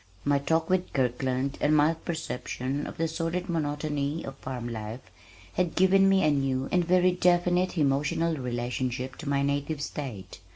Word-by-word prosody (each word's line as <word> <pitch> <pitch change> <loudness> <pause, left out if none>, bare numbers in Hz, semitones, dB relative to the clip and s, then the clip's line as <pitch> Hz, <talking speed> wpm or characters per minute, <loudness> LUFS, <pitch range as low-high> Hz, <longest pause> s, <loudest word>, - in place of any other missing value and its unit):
My 145 0 +3
talk 160 +3 +1
with 185 -1 0
Kirkland 130 +1 0
and 150 +1 +4
my 150 +2 +4
perception 145 -4 -4
of - - -8
the 165 - +1
sordid 165 +3 -2
monotony 150 -2 -2
of 135 - -7
farm 125 -3 -5
life 110 +1 -6 0.4
had 180 -3 0
given 195 +1 +5
me 195 0 +4
a 155 - +4
new 135 -2 0
and 180 -1 +3
very 180 +1 +4
definite 180 0 +2
emotional 145 +3 +1
relationship 125 0 -3
to 155 - -5
my 140 0 +2
native 140 +2 -1
state. 120 -11 -6
145 Hz, 160 wpm, -28 LUFS, 130-165 Hz, 0.4 s, given